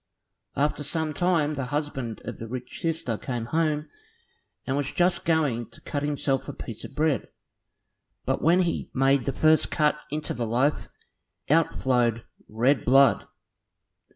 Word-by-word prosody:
After 145 +1 0
some 155 +1 -2
time 165 -3 +1
the 135 -3 -3
husband 135 -5 -3
of - - -6
the 115 - -6
rich 125 +1 -6
sister 160 - -2
came 120 -3 -4
home, 155 +2 0 0.8
and 130 - -1
was 145 -1 -1
just 175 0 +1
going 145 -9 +1
to - - -14
cut 145 - -3
himself 145 -2 -1
a - - -5
piece 115 - -8
of 135 - -9
bread, 150 -5 +1 1.0
but - - 0
when 175 +4 +4
he 170 - -2
made 135 -1 +3
the 135 - 0
first 155 +4 +3
cut 150 -1 +2
into 150 +1 -3
the 120 -1 -3
loaf, 130 +6 0 0.6
out 165 +1 +3
flowed 120 -3 +1 0.3
red 120 +4 +2
blood. 135 0 +5
145 Hz, 155 wpm, -26 LUFS, 125-155 Hz, 1.0 s, blood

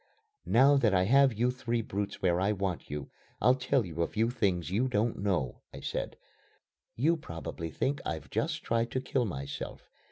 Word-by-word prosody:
"Now 140 +4 +6
that 110 -7 +3
I 90 - +4
have 135 +6 +5
you 120 +3 +1
three 120 -2 -2
brutes 100 -1 -4
where 90 -1 +3
I 100 +3 +2
want 95 -4 -3
you, 75 -1 -5 0.3
I'll 125 - +5
tell 130 -2 +1
you 85 -1 -4
a 85 - +2
few 115 +2 0
things 95 -8 0
you 115 +7 +2
don't 115 -1 0
know," 95 -11 -1
I - - -9
said. - - -3 0.8
"You 155 +8 +3
probably 85 - -6
think 135 - -1
I've - - -5
just - - -1
tried 115 0 0
to 130 - +1
kill 130 -1 0
myself. 70 -7 -6
110 Hz, 185 wpm, -30 LUFS, 90-125 Hz, 0.8 s, Now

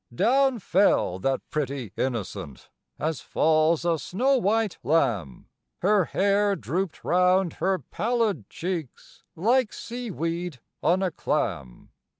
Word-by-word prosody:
Down 265 - +3
fell 185 - +2
that 135 +7 -1
pretty 140 -7 -3
innocent, 105 - -4 0.3
as 155 -2 -2
falls 160 +1 +2
a 165 -2 +1
snow 255 - +1
white 220 -2 0
lamb, 115 - 0 0.4
Her 200 -1 +4
hair 200 +2 +2
drooped 180 +2 -3
round 180 0 +3
her 190 0 +2
pallid 215 - -1
cheeks, 170 -6 -6
like 230 +6 +2
sea 240 0 -6
weed 170 -4 -3 0.2
on 185 +3 +2
a 185 - 0
clam. 85 - -3
175 Hz, 120 wpm, -26 LUFS, 140-205 Hz, 0.4 s, Her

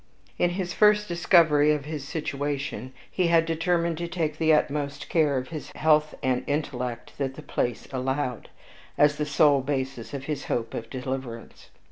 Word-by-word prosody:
On 175 - +3
his 175 0 -3
first 210 0 +4
discovery 165 -4 +4
of 145 -2 -3
his 150 -2 -5
situation, 140 -4 -3 0.2
he 180 -2 +1
had 165 -1 +4
determined 170 0 0
to 170 - -2
take 160 -3 -2
the 160 -1 +4
utmost 145 -1 0
care 150 -5 +2
of 130 0 -4
his 155 -2 -7
health 155 -1 +3
and 130 -1 +1
intellect 130 -5 -3
that 135 -1 -2
the - - -10
place 120 -2 -2
allowed, 130 -1 -2 0.5
as 150 0 +4
the 150 - -1
sole 145 -1 +4
basis 130 -3 -3
of 135 - -5
his 150 0 -4
hope 115 -1 -2
of 115 0 -5
deliverance. 130 -3 -6
145 Hz, 165 wpm, -26 LUFS, 135-160 Hz, 0.5 s, first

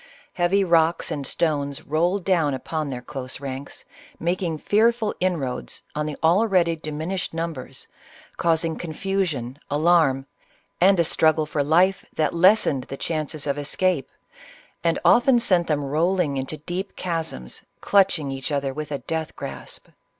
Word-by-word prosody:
Heavy 185 +3 +2
rocks 165 -2 +2
and 140 -2 -3
stones 145 -4 -1
rolled, 175 +5 0
down 165 -7 +2
upon 155 +3 -3
tlu 130 - -3
ir 125 - -6
close 130 0 -6
ranks, 135 0 -6 0.3
making 170 -1 -1
fearful 220 +5 +2
inroads 155 -9 -2
on 150 0 -2
the 150 - -4
already 175 -1 +3
diminished 160 +4 -4
numbers, 165 -5 -4 0.5
causing 165 -1 +1
confusion, 160 -7 -2
alarm, 150 -3 +3 0.6
and 190 0 +5
a - - +5
struggle 155 -1 +2
for 150 -1 -1
life 180 +6 +3
that 155 - +1
lessened 170 -7 +4
the 135 - -7
chances 155 -1 -3
of 145 0 -1
escape, 150 0 0 0.7
and 165 -1 +2
often 245 +1 +6
sent 185 -7 +2
them 150 -2 0
rolling 160 +2 +1
into 135 +3 -3
deep 180 +6 -5
chasms, 165 - -4 0.2
clutching 185 -8 +2
each 135 +2 -4
other 140 -2 -1
with 150 +1 -6
a 140 - -1
death 160 +2 -4
grasp. - - -7
160 Hz, 145 wpm, -24 LUFS, 145-180 Hz, 0.7 s, often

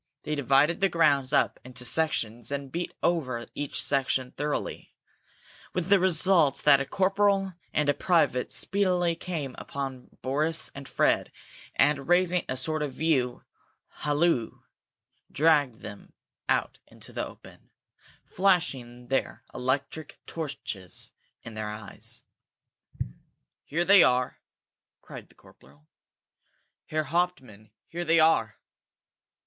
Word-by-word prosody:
They 150 - -3
divided 145 +3 +3
the 195 0 +3
grounds 140 -6 +3
up 145 - +2
into 125 0 -5
sections, 120 -5 0
and 140 -1 -4
beat 175 +1 -3
over 130 -9 0
each 145 -4 -2
section 130 0 +1
thoroughly, 145 +1 -4 0.8
with 180 0 -1
the 200 -1 +6
result 175 -4 +3
that 140 - +6
a 135 - -3
corporal 195 +1 +2 0.2
and 150 -1 0
a 145 - +4
private 145 -7 +1
speedily 180 -4 +2
came 160 -7 -4
upon 135 -2 -6
Boris 155 +5 +1
and 140 -1 -9
Fred, - - +1 0.4
and, 145 -2 +2
raising 180 0 +3
a 130 - -1
sort 155 +4 -2
of 145 -3 -3
view 135 -6 0 0.6
halloo, 150 -5 0 0.7
dragged 145 -6 +3
them 100 -1 -10 0.4
out - - 0
into - - -11
the - - -2
open, - - -15 0.5
flashing 135 -11 0
their 135 - -1
electric 135 +4 -3
torches 110 - -6 0.3
in 115 - -9
their 110 -1 -4
eyes. 105 -1 -7 1.4
"Here 170 +4 -1
they 195 0 +8
are!" 125 -2 +2 0.6
cried - - -10
the - - -22
corporal. 75 +3 -21 1.0
"Herr 155 0 -1
Hauptmann, 135 - -2 0.2
here 175 +2 -4
they 165 -1 +3
are!" 115 -10 +3
145 Hz, 120 wpm, -27 LUFS, 125-170 Hz, 1.4 s, they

